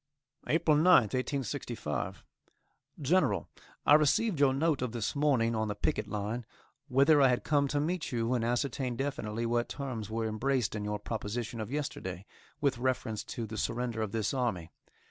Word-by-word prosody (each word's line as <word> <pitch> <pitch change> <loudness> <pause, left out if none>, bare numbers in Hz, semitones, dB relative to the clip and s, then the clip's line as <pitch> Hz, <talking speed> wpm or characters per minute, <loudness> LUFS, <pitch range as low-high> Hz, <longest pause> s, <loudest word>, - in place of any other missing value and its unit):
APRIL 155 -1 +3
9th, 155 - +5
1865. 130 - -3 0.8
GENERAL: 140 - +2 0.4
I - - +6
received 155 +5 +4
your 140 -2 +5
note 145 +1 +1
of 125 -2 -2
this 115 +1 -2
morning, 135 -6 +2
on 110 -1 0
the 105 - -3
picket - - -1
line, 105 +3 -3 0.4
whither 140 +3 +5
I 135 - +7
had 125 -1 +1
come 145 -2 +2
to 145 +1 0
meet 165 +3 -1
you 120 0 0
and 120 -2 0
ascertain 125 +1 -1
definitely 115 -4 -2
what 120 +1 0
terms 125 -7 -5
were 115 0 -2
embraced 120 +2 0
in 105 -1 -3
your 105 0 -1
proposition 115 +2 -4
of 110 - -5
yesterday, 105 -10 -4 0.3
with 135 -4 +1
reference 120 -4 -1
to 115 - -4
the 110 0 -5
surrender 115 -1 -2
of 110 -2 -2
this 110 +2 -1
army. 110 -11 -1
120 Hz, 165 wpm, -31 LUFS, 110-140 Hz, 0.8 s, I